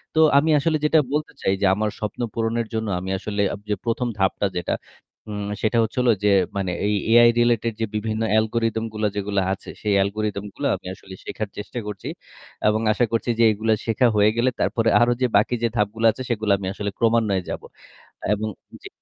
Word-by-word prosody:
তো - - +3 0.2
আমি 155 +3 +3
আসলে 155 +1 +1
যেটা 155 +1 +5
বলতে 150 +1 -1
চাই 95 - +2
যে - - +3
আমার 105 0 0
স্বপ্ন 105 +3 -4
পূরণের 115 0 -1
জন্য 110 -1 -2
আমি 95 +1 -6
আসলে 100 0 -2
আপ - - -6
যে 105 - +2
১ম 120 +1 0
ধাপটা 95 +1 +1
যেটা, 85 - -1 0.6
উম 105 0 -4
সেটা 110 +2 +1
হচ্ছে 110 - -5
হলো 120 -2 +4
যে 105 - +4 0.3
মানে 95 -2 -1 0.2
এই 105 - +1 0.2
AI 120 0 +8
related 115 -1 +2
যে - - +2
বিভিন্ন 110 +1 -2 0.2
algorythm 110 0 0
গুলা 110 0 0
যেগুলা 100 -1 0
আছে, - - -9
সেই 105 -2 +1
algorythm 105 0 -3
গুলা 140 - -2
আমি - - -13
আসলে 95 -1 -13
শেখার 110 -2 -4
চেষ্টা 105 +4 -5
করছি। 100 -3 -6 0.6
এবং 110 +1 +2
আশা 120 +3 +2
করছি 115 +1 -1
যে - - +5
এগুলা 110 +1 +1
শেখা 115 +2 +3
হয়ে 105 +1 +5
গেলে 125 +2 +3
তারপরে 115 -1 +1
আরো 120 0 +4
যে 125 - +4
বাকি 115 +4 +2
যে - - +4
ধাপগুলো 110 +2 0
আছে, 130 - -9
সেগুলো 110 -3 0
আমি 95 -1 -5
আসলে 100 0 -3
ক্রমান্বয়ে 110 -5 +2
যাবো। - - -5 0.7
এবং 110 +1 -3 0.3
জি। - - -8
110 Hz, 200 wpm, -23 LUFS, 105-115 Hz, 0.7 s, AI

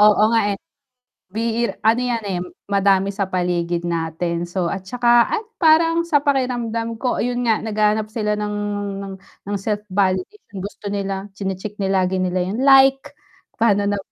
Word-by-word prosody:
Oo 210 0 +6
nga 225 - +4
eh. - - -3 1.3
Ano 225 +3 +3
yan 240 -3 -1
eh, 190 -3 -2 0.3
madami 195 0 +3
sa 195 -1 -2
paligid 175 -2 -1
natin, 170 +1 -2
so 175 -1 -2
at 190 -1 -7
tsaka, 240 +1 +4
at 430 - -2 0.2
parang 330 +1 +5
sa 315 -4 +4
pakiramdam 240 -5 -1
ko 250 +2 -1
yun 245 0 -1
nga 225 -2 +2
naghahanap 215 0 +1
sila 215 -1 -1
ng 210 0 -3 0.5
ng 195 - -7 0.3
ng 205 +1 -2
self-validation 200 - -2
gusto 205 +1 -7
nila 195 0 -3
chine-check 195 +1 -4
lagi 190 -1 +1
nila 185 0 0
yung 220 +7 -2
like, 270 +1 +5 0.5
pa'no 205 -3 +3
na 205 0 0
210 Hz, 150 wpm, -21 LUFS, 190-235 Hz, 1.3 s, Oo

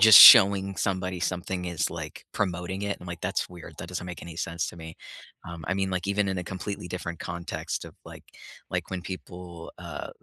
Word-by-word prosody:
just 110 -1 +11
showing 100 -4 +10
somebody 95 -2 -1
something 90 +1 -2
is, 85 -3 -1
like, - - -7
promoting 95 0 -2
it. 100 0 -1
I'm, 90 - -10
like, 85 -1 -6
"That's - - -1
weird. 90 -2 -11
That 85 - -7
doesn't 90 0 -4
make 90 -3 -7
any 85 -1 -8
sense 85 -1 -2
to - - -9
me." 80 -1 -9 0.5
Um, 85 -2 -7
I 90 - +1
mean, 95 -1 0
like, 90 +1 -2
even 100 0 +1
in 95 -1 -1
a 90 - -4
completely 95 0 -5
different 85 -2 -5
context 85 0 -4
of, - - -11
like - - -11 0.4
like, - - -3
when 95 -1 -3
people, 90 -2 -8
uh, - - -6
90 Hz, 205 wpm, -27 LUFS, 85-95 Hz, 0.5 s, just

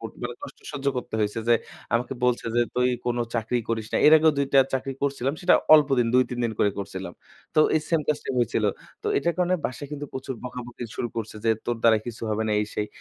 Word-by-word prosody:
কো - - -12 0.2
মানে 120 0 -3
কষ্ট - - -9
সহ্য 140 -1 -5
করতে 125 - -5
হইছে 105 +1 -1
যে, 120 - +7 0.4
আমাকে 120 +3 0
বলছে 125 -1 +1
যে, - - +5
"তুই 125 0 +3 0.2
কোনো 120 0 0
চাকরিই 115 +1 0
করিস 110 -2 -1
না।" - - +2
এর 150 - +8
আগেও 155 0 +4
২ 140 - +2
টা 135 - +8
চাকরি 135 +1 -2
করছিলাম। 140 0 0
সেটা 180 0 +5 0.2
অল্পদিন 135 -5 +4
২-৩ 125 -1 +2
দিন 115 - -1
করে 105 - +3
করছিলাম। 95 -2 -5 0.4
তো 155 - +5
এই 155 - +3
সেইম 165 -2 +2
কাজটাই 150 -2 -1
হয়েছিল। 115 -2 +1 0.4
তো - - -5
এটা 155 +5 +1
কারণে 180 0 +2
বাসায় 135 +3 -7
কিন্তু 145 0 -5
প্রচুর 130 0 -5
বকাবকি 120 -1 -7
শুরু 120 - -2
করছে। 110 -1 -4
যে 115 - +4 0.2
তোর 120 - 0
দ্বারা 110 -2 +5
কিছু 115 -1 -7
হবে 110 +1 0
না - - +1
এই 105 - -1
সেই। 105 - -1
125 Hz, 225 wpm, -25 LUFS, 115-140 Hz, 0.4 s, এর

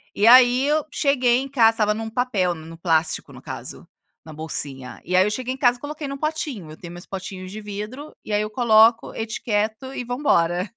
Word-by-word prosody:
e 205 - +2
aí 250 +2 +7
eu 305 0 +2
cheguei 255 -5 +2
em 275 - -5
casa 230 -5 +4
estava 210 -2 +1
num 220 +1 -5
papel, 220 -7 0
no 160 +1 -11
plástico, 160 -2 0
no - - -13
caso, - - -8 0.4
na 155 - -10
bolsinha, 135 -5 -3
e 180 - -1
aí 185 +1 +5
eu - - +1
cheguei 255 +3 -3
em - - -9
casa 245 -2 +3
e - - -30
coloquei 295 0 -6
num 275 0 -5
potinho. 290 - -4
Eu 155 - -11
tenho 175 -1 -10
meus 175 +1 -9
potinhos 185 -1 -7
de 215 +1 -7
vidro 210 +8 -7
e 210 - -5
aí 205 - +2
eu 215 - -3
coloco, 225 0 +4
etiqueto 220 +3 -3
e 250 - -4
vambora. 185 - +1
220 Hz, 210 wpm, -22 LUFS, 185-255 Hz, 0.4 s, aí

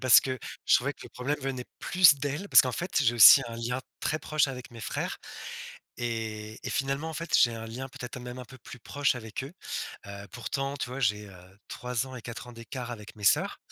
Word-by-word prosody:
parce 130 -4 +8
que 130 -1 -3 0.3
je - - +6
trouvais - - -1
que - - -24
le - - -10
problème 130 +4 -2
venait 130 -2 -3
plus 175 -5 +6
d'elles. 145 +8 -3
Parce - - +9
qu'en 130 -1 -1
fait 175 +8 -4
j'ai 120 -2 +3
aussi 115 - +10
un 115 - -7
lien 120 +2 -2 0.2
très 155 - 0
proche 155 -2 +1
avec 125 -2 -7
mes 115 -1 -10
frères. - - -3 0.8
Et 110 -2 -4
et - - -2
finalement 140 +4 -1
en 160 - -6
fait, 170 0 0
j'ai 120 -1 +4
un 115 0 -6
lien 125 +4 -6
peut-être 125 -1 -8
même 125 0 -8
un 125 - -7
peu 130 +2 -14
plus 125 - -11
proche 140 +3 0
avec 110 +2 -6
eux. 140 - -9 0.5
Heu, 100 0 -8
pourtant 135 +3 -3
tu 125 - -4
vois 130 +2 -5
j'ai, 105 -3 +1
heu, 95 +1 -16
3 125 +1 -3
ans 130 - -9
et 120 - -8
4 120 +1 -7
ans 120 - -10
d'écart 120 +2 -7
avec 105 -2 -10
mes 105 - -8
sœurs, 100 - +3
125 Hz, 230 wpm, -28 LUFS, 115-135 Hz, 0.8 s, aussi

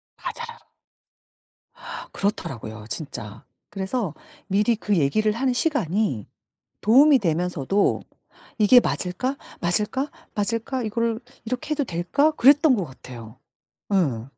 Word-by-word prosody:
맞아요. 470 -1 -7 1.5
그렇더라고요 115 - -3
진짜. 110 -9 -6 0.3
그래서 195 - -2 0.3
미리 210 +4 +2
그 205 -3 0
얘기를 210 +9 +2
하는 255 +2 0
시간이 210 - 0 0.5
도움이 270 +6 +6
되면서도 180 +1 +1 0.6
'이게 230 +4 +8
맞을까? 250 +8 -2 0.2
맞을까? 210 +11 0 0.3
맞을까? 230 +4 -1
이거를 230 +1 -1 0.3
이렇게 255 +6 -4
해도 295 -1 +1
될까?' 230 - +1
그랬던 290 0 +5
것 190 -5 -2
같아요. 125 -4 -11 0.5
예. 135 -11 +1
210 Hz, 255 characters per minute, -24 LUFS, 165-255 Hz, 1.5 s, 이게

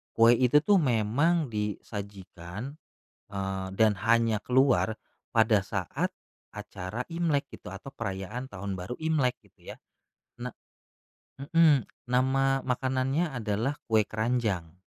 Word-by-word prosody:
kue 115 +1 +7
itu 125 +4 +4
tuh 200 0 +5
memang 135 +5 +2
disajikan, 100 0 -5 0.6
eee, 95 -1 -3
dan 110 +1 +5 0.2
hanya 115 -1 +4
keluar, 125 -3 +3 0.4
pada 110 -3 +4
saat - - -2 0.4
acara 105 +1 -5
Imlek 165 -4 0
gitu, 90 - -10
atau 105 +8 -8
perayaan 105 0 -5
tahun 100 -4 -5
baru 90 +7 -5
Imlek 140 -6 +1
gitu - - -13
ya. - - -14 0.7
Na 125 - -3 0.9
mmm, 150 -2 +4 0.2
nama 135 +2 +2
makanannya 130 +5 0
adalah 115 +4 -1
kue 110 -1 +4
keranjang. 110 -7 -1
115 Hz, 110 wpm, -28 LUFS, 105-135 Hz, 0.9 s, kue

